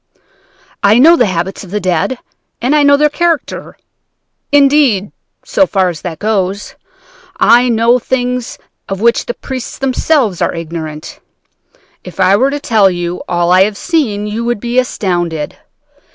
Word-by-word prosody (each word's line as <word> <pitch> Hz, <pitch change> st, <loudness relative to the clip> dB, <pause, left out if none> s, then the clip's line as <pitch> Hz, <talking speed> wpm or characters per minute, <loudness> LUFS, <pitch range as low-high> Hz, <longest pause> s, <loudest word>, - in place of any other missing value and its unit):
I 205 Hz, +2 st, +4 dB
know 320 Hz, +7 st, +7 dB
the 245 Hz, -8 st, +2 dB
habits 185 Hz, +2 st, -3 dB
of 190 Hz, -, -12 dB
the 210 Hz, +3 st, -2 dB
dead, 185 Hz, +6 st, -1 dB, 0.4 s
and 260 Hz, +5 st, +1 dB
I 300 Hz, -, +4 dB
know 285 Hz, 0 st, +5 dB
their 300 Hz, +1 st, +3 dB
character. 335 Hz, +1 st, -2 dB, 0.7 s
Indeed, 275 Hz, -8 st, +3 dB, 0.3 s
so 290 Hz, -, +2 dB
far 190 Hz, -2 st, +1 dB
as 165 Hz, -3 st, -7 dB
that 170 Hz, -3 st, -6 dB
goes, 200 Hz, 0 st, -2 dB, 0.7 s
I 245 Hz, +1 st, +4 dB
know 235 Hz, +2 st, +3 dB
things 250 Hz, -1 st, -3 dB, 0.3 s
of 195 Hz, -1 st, -3 dB
which 235 Hz, +2 st, +1 dB
the 240 Hz, -, -3 dB
priests 260 Hz, -2 st, -7 dB
themselves 260 Hz, -, 0 dB
are -, -, 0 dB
ignorant. 160 Hz, -2 st, -7 dB, 0.8 s
If 180 Hz, 0 st, -11 dB
I 185 Hz, +1 st, +4 dB
were 260 Hz, +6 st, +2 dB
to 290 Hz, +1 st, -3 dB
tell 220 Hz, -8 st, +3 dB
you 175 Hz, -1 st, -4 dB
all 175 Hz, 0 st, +1 dB
I 185 Hz, +1 st, +5 dB
have 205 Hz, -1 st, -4 dB
seen, 235 Hz, -, -1 dB
you 215 Hz, +2 st, -4 dB
would 240 Hz, -2 st, -1 dB
be 240 Hz, +3 st, 0 dB
astounded. 175 Hz, -10 st, -2 dB
215 Hz, 155 wpm, -13 LUFS, 185-255 Hz, 0.8 s, know